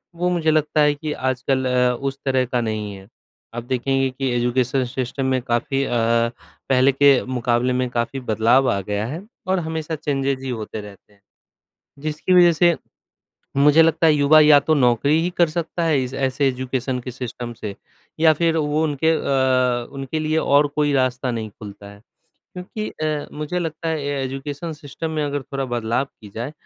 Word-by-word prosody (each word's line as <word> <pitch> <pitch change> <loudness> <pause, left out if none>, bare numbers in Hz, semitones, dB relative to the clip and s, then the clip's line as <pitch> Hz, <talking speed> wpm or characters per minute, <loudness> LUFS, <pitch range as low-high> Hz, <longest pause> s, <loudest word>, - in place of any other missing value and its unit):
वो 180 +1 0
मुझे 165 -3 +1
लगता 155 0 +2
है 150 0 +4
कि 150 +1 -5
आजकल 130 0 -1
अ, 125 -1 +2
उस 135 0 -3
तरह 130 -1 +2
का 125 0 -1
नहीं 110 -2 -3
है। 95 0 -13 0.5
आप 120 - -4
देखेंगे 135 +2 0
कि 130 +1 -3
एजुकेशन 125 +2 +1
सिस्टम 130 +1 -3
में 130 -1 +1
काफ़ी 130 +3 -1
अ, - - -3 0.8
पहले 130 +1 +4
के 140 +1 +5
मुकाबले 125 0 0
में 125 0 0
काफ़ी 120 +2 -2
बदलाव 120 +3 +2
आ 100 - 0
गया 105 +2 -3
है 155 +8 -5 0.3
और 190 0 +1
हमेशा 160 -1 -4
चेंजेज़ 135 -3 -2
ही 135 - -4
होते 110 -2 -5
रहते 105 0 -14
हैं 100 - -29 0.8
जिसकी 155 +4 -1
वज़ह 175 -1 +7
से 170 +1 +3 0.8
मुझे 145 +3 +6
लगता 165 0 +3
है 160 - +6
युवा 150 +2 +5
या 150 -1 +7
तो 155 - +1
नौकरी 140 +3 +3
ही 175 - -1
कर 170 -2 +4
सकता 170 +1 -3
है 150 -5 +2
इस 130 +1 -5
ऐसे 135 +1 0
एजुकेशन 130 0 -2
के 125 - -7
सिस्टम 125 -1 -6
से 105 -2 -5 0.5
या 160 -1 +6
फिर 165 +1 +1
वो 150 0 0
उनके 155 +1 +1
अ, 130 -5 +1
उनके 135 +3 -4
लिए 155 +1 0
और 145 -1 +3
कोई 150 -1 +2
रास्ता 130 -1 0
नहीं 110 -3 -4
खुलता 100 -1 -11
है। 100 0 -15 0.6
क्योंकि 200 +4 -5
अ, 155 -1 -3
मुझे 150 +4 -3
लगता 165 -1 -4
है 160 - 0 0.2
अ, - - -2
एजुकेशन 145 +5 -5
सिस्टम 150 +2 -6
में 155 -1 -1
अगर 145 -1 -2
थोड़ा 135 +1 -4
बदलाव 120 +1 -1 0.2
की 105 - -11
जाए 120 +6 -4
135 Hz, 185 wpm, -21 LUFS, 125-155 Hz, 0.8 s, वज़ह